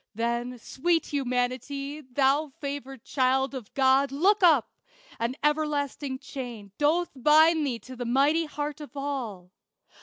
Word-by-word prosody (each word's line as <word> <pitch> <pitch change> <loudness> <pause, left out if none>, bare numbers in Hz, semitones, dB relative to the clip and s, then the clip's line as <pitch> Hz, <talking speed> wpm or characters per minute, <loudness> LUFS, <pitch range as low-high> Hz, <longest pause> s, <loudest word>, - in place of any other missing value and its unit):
Then, 235 +2 -2
sweet 325 +8 0
Humanity, 275 +2 -2
thou 275 +3 +1
favored 275 -3 -6
child 265 0 +1
Of 250 -6 -7
God, 270 0 +4
look 390 +9 +3
up! 315 -9 +5 0.5
An 235 +3 -1
everlasting 295 -2 0
chain 240 -7 -8
Doth 320 +4 +2
bind 310 +3 +5
thee 245 -3 -2
to 255 - -10
the 245 0 -5
mighty 285 +7 +3
heart 295 0 -5
of 290 -1 -10
all. 240 -11 -4
275 Hz, 130 wpm, -27 LUFS, 250-300 Hz, 0.5 s, up